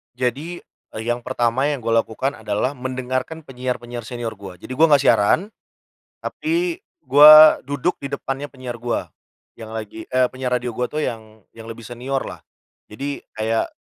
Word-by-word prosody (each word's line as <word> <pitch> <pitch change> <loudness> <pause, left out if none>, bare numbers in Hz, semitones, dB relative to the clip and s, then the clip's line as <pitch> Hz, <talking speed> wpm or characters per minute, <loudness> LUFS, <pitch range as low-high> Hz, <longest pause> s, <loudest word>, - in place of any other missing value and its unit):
Jadi, 135 +8 -3 0.3
e - - -9
yang 120 0 -1
pertama 125 0 0
yang 145 - -3
gua 115 -1 +2
lakukan 135 +6 -3
adalah 110 +5 -2
mendengarkan 130 +4 -4
penyiar-penyar 125 -2 -5
senior 115 -1 -5
gua. 95 -3 -11
Jadi - - -10
gua 160 +5 +6
gak 140 - +1
siaran, 105 - +4 0.7
tapi 340 +2 -2 0.2
gua 155 +2 +9
duduk 145 +5 -1
di 140 0 -6
depannya 135 0 -4
penyiar 130 -3 -7
gua, 120 0 -3 0.5
yang 110 -1 -9
lagi, 110 0 -6
eee, 130 0 +2
penyiar 130 0 -4
radio 125 0 -4
gua 125 - 0
tuh 155 - -3
yang, 110 -5 -5 0.2
yang 115 - -10
lebih 115 +1 -9
seniorlah. 125 +4 -5 0.5
Jadi 140 +6 -5
kayak 110 +1 -1
125 Hz, 155 wpm, -21 LUFS, 115-140 Hz, 0.7 s, gua